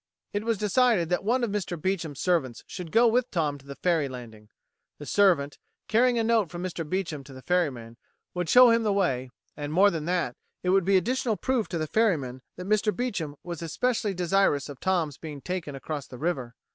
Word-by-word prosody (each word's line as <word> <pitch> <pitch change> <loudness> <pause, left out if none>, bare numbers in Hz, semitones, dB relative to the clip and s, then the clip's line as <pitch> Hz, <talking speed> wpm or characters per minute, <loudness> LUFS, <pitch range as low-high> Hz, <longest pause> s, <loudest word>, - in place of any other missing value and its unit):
It 205 +1 -1
was 230 -1 0
decided 210 -3 +2
that 180 - 0
one 240 +4 +1
of 230 - 0
Mr. 185 -5 -3
Beecham's 165 -5 -2
servants 160 -10 0
should 180 -3 -7
go 235 +5 +5
with 245 +2 +2
Tom 150 -5 -1
to 135 - -19
the 140 - -7
ferry 165 -5 +1
landing. 110 -4 -10 0.5
The 145 - -9
servant, 170 -7 +2 0.3
carrying 240 +2 +3
a 230 - +2
note 225 -5 +2
from 175 +1 -6
Mr. 165 -4 -4
Beecham 165 -6 -2
to 135 0 -13
the 130 0 -11
ferryman, 130 -11 -1 0.4
would 180 -2 -2
show 250 -1 +8
him 230 0 +3
the 215 -2 +1
way, 135 -11 0 0.3
and, 145 0 -5
more 195 +5 +5
than 160 -3 -4
that, 175 -8 -1 0.3
it 180 - 0
would 190 -1 +3
be 195 0 +5
additional 230 +3 0
proof 255 -4 0
to 170 - -3
the 155 - -1
ferryman 150 - 0 0.2
that 180 - -6
Mr. 215 +1 +2
Beecham 195 -12 -3
was 170 -2 -6
especially 210 +4 -1
desirous 175 -5 +2
of 140 - -9
Tom's 170 -7 0
being 150 -3 -7
taken 175 -3 -4
across 145 0 -5
the 125 - -10
river. 130 -6 -2
175 Hz, 210 wpm, -27 LUFS, 145-205 Hz, 0.5 s, show